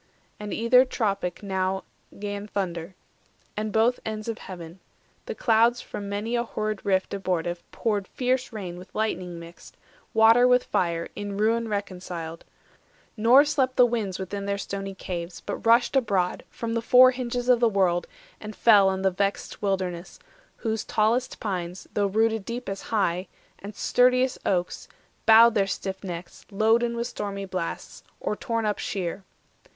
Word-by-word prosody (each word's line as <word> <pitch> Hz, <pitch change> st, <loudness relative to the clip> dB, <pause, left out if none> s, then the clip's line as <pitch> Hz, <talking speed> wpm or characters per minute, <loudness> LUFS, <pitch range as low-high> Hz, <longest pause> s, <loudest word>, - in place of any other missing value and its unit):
And 210 Hz, -1 st, -6 dB
either 245 Hz, +3 st, +5 dB
tropic 200 Hz, -7 st, -2 dB
now 190 Hz, -1 st, -1 dB, 0.3 s
'Gan 205 Hz, 0 st, -5 dB
thunder, 180 Hz, -3 st, -4 dB, 0.6 s
and 215 Hz, 0 st, -2 dB
both 225 Hz, +4 st, +2 dB
ends 215 Hz, 0 st, -5 dB
of 225 Hz, -1 st, -3 dB
heaven; 175 Hz, -1 st, -9 dB, 0.5 s
the -, -, -4 dB
clouds 235 Hz, +1 st, +3 dB
410 -, -, -13 dB
From 200 Hz, -1 st, -5 dB
many 210 Hz, +4 st, -2 dB
a 235 Hz, -, +2 dB
horrid 215 Hz, -3 st, -3 dB
rift 190 Hz, -1 st, 0 dB
abortive 175 Hz, -3 st, -2 dB
poured 205 Hz, -4 st, -1 dB
Fierce 255 Hz, 0 st, -1 dB
rain 185 Hz, -5 st, -6 dB
with 185 Hz, +1 st, -14 dB
lightning 185 Hz, -5 st, -2 dB
mixed, 170 Hz, +1 st, -13 dB, 0.4 s
water 225 Hz, +3 st, +6 dB
with 250 Hz, 0 st, +4 dB
fire, 170 Hz, -1 st, -1 dB
In 205 Hz, -1 st, -5 dB
ruin 225 Hz, +2 st, +1 dB
reconciled; 180 Hz, -5 st, -5 dB, 0.7 s
nor 240 Hz, +6 st, +6 dB
slept 265 Hz, -3 st, 0 dB
the 250 Hz, -, +7 dB
winds 220 Hz, -6 st, -2 dB
Within 200 Hz, +1 st, -5 dB
their 200 Hz, 0 st, 0 dB
stony 195 Hz, 0 st, -5 dB
caves, 175 Hz, -2 st, -6 dB
but -, -, -4 dB
rushed 235 Hz, +3 st, +4 dB
abroad 200 Hz, -8 st, +1 dB
From 230 Hz, -1 st, -4 dB
the 230 Hz, -, 0 dB
four 255 Hz, +2 st, +7 dB
hinges 245 Hz, -1 st, -3 dB
of 250 Hz, -2 st, +5 dB
the 235 Hz, -1 st, +4 dB
world, 185 Hz, -4 st, +1 dB, 0.3 s
and 215 Hz, 0 st, -8 dB
fell 205 Hz, -4 st, +6 dB
On 190 Hz, 0 st, -2 dB
the 190 Hz, -, +3 dB
vexed 200 Hz, +2 st, -2 dB
wilderness, 185 Hz, -3 st, -2 dB, 0.4 s
whose 220 Hz, -2 st, -2 dB
tallest 230 Hz, +4 st, 0 dB
pines, 180 Hz, -3 st, -4 dB
Though 205 Hz, -1 st, +1 dB
rooted 220 Hz, +1 st, +1 dB
deep 235 Hz, +2 st, -6 dB
as 195 Hz, 0 st, -4 dB
high, 185 Hz, -4 st, -1 dB, 0.3 s
and 205 Hz, +1 st, -9 dB
sturdiest 250 Hz, +1 st, +2 dB
oaks, 180 Hz, -2 st, -1 dB, 0.4 s
Bowed 230 Hz, +1 st, +8 dB
their 200 Hz, -3 st, +2 dB
stiff 190 Hz, 0 st, -4 dB
necks, 175 Hz, -2 st, -7 dB
loaden 225 Hz, +3 st, +2 dB
with 235 Hz, 0 st, -2 dB
stormy 200 Hz, -4 st, -4 dB
blasts, 185 Hz, -3 st, -5 dB, 0.2 s
Or -, -, -2 dB
torn 230 Hz, +1 st, -2 dB
up 210 Hz, -1 st, -1 dB
sheer. 190 Hz, 0 st, -3 dB
205 Hz, 160 wpm, -26 LUFS, 190-230 Hz, 0.7 s, Bowed